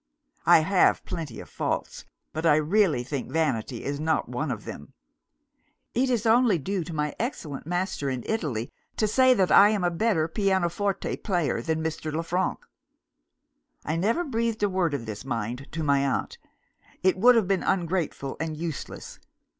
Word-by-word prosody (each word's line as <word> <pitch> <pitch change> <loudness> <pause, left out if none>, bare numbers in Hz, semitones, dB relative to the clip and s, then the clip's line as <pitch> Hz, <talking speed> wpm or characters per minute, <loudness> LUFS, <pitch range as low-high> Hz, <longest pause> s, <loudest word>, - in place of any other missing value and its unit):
I 170 -2 +8
have 180 +3 +3
plenty 150 -9 -5
of - - -12
faults, - - -3 0.3
but 160 - -3
I 160 -3 +5
really 155 - +2
think 135 0 -5
vanity 130 -6 -1
is 140 +1 -3
not 160 0 0
one 125 +5 -3
of 115 -4 -4
them. 70 - -9 1.0
It 255 +2 +1
is 240 -3 0
only 230 -3 +4
due 185 +5 -2
to 170 - -7
my 150 -2 -2
excellent 155 - -4
master 175 -5 -1
in 130 -3 -3
Italy 140 - -2 0.3
to 215 - +2
say, 255 +4 +5
that 190 -4 +2
I 205 - +8
am 210 -3 0
a 175 - +2
better 170 -3 +1
pianoforte 190 +1 0
player 175 -8 -1
than 160 -1 -1
Mr. 155 -1 -3
Le 160 +2 -2
Frank. 180 +3 -1 1.2
"I 155 - -1
never 220 - +1
breathed 230 -6 -1
a 205 - +3
word 180 -5 0
of 115 - -5
this, 110 0 -6
mind, 120 +1 -4
to 160 0 -2
my 140 -2 +3
aunt. 140 - -2 0.6
It 185 0 +4
would 245 +6 +6
have 220 -5 +3
been 195 -1 +1
ungrateful 170 -7 -1
and 160 -1 -3
useless. 160 -3 -6
165 Hz, 170 wpm, -26 LUFS, 145-200 Hz, 1.2 s, I